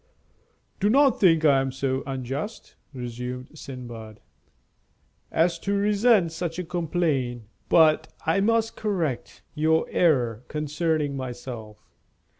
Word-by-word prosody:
"Do 200 Hz, +2 st, +2 dB
not 275 Hz, +1 st, +4 dB
think 165 Hz, -5 st, +4 dB
I 140 Hz, -3 st, +5 dB
am 135 Hz, 0 st, -2 dB
so 135 Hz, 0 st, -1 dB
unjust," 135 Hz, -, -5 dB, 0.2 s
resumed 125 Hz, 0 st, -6 dB
Sindbad, 120 Hz, -7 st, -9 dB, 1.1 s
"as 170 Hz, +1 st, +2 dB
to 200 Hz, -, -2 dB
resent 205 Hz, -2 st, +3 dB
such 165 Hz, 0 st, -4 dB
a 180 Hz, -, -2 dB
complaint. 155 Hz, -8 st, -1 dB, 0.3 s
But 160 Hz, -2 st, +5 dB, 0.2 s
I 165 Hz, +5 st, +2 dB
must 225 Hz, +2 st, +1 dB
correct 175 Hz, -, -3 dB
your 160 Hz, +1 st, +2 dB
error 125 Hz, -10 st, +2 dB
concerning 150 Hz, -1 st, -1 dB
myself. 120 Hz, -4 st, -7 dB
155 Hz, 110 wpm, -25 LUFS, 130-175 Hz, 1.1 s, I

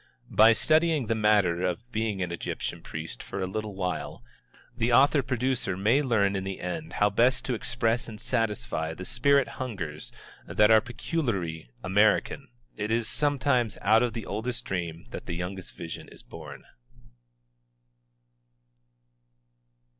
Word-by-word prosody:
By 110 Hz, +2 st, +7 dB
studying 155 Hz, +2 st, +2 dB
the 115 Hz, -, +1 dB
matter 105 Hz, -6 st, +3 dB
of 110 Hz, +7 st, -3 dB
being 110 Hz, -4 st, -1 dB
an 90 Hz, -, -4 dB
Egyptian 85 Hz, -, -4 dB
priest 80 Hz, -6 st, -6 dB
for -, -, -6 dB
a 95 Hz, -, 0 dB
little 105 Hz, +2 st, -4 dB
while, 90 Hz, -3 st, -3 dB, 0.5 s
the 120 Hz, 0 st, 0 dB
author 140 Hz, +4 st, +5 dB
producer 125 Hz, -5 st, -1 dB
may 110 Hz, +9 st, +3 dB
learn 105 Hz, -7 st, +2 dB
in 95 Hz, -, -2 dB
the 95 Hz, 0 st, -5 dB
end 150 Hz, -, -5 dB
how 105 Hz, 0 st, +2 dB
best 120 Hz, +5 st, +2 dB
to 130 Hz, -, -1 dB
express 120 Hz, 0 st, -1 dB
and 105 Hz, -2 st, -9 dB
satisfy 110 Hz, -9 st, -1 dB
the 90 Hz, -, -7 dB
spirit 140 Hz, +5 st, +3 dB
hungers 85 Hz, -12 st, -5 dB, 0.4 s
that 105 Hz, +1 st, +4 dB
are 110 Hz, -1 st, +7 dB
peculiarly 115 Hz, -, -3 dB
American. 105 Hz, +8 st, +2 dB, 0.3 s
It 105 Hz, 0 st, -3 dB
is 115 Hz, 0 st, +1 dB
sometimes 140 Hz, -6 st, +1 dB
out 110 Hz, +3 st, +5 dB
of 120 Hz, -2 st, 0 dB
the 115 Hz, -2 st, -5 dB
oldest 115 Hz, +4 st, -3 dB
dream 85 Hz, -3 st, -4 dB
that -, -, -7 dB
the 85 Hz, -, -3 dB
youngest 90 Hz, +2 st, -6 dB
vision 85 Hz, -1 st, -7 dB
is -, -, -12 dB
born. -, -, -10 dB
110 Hz, 145 wpm, -27 LUFS, 95-125 Hz, 0.5 s, By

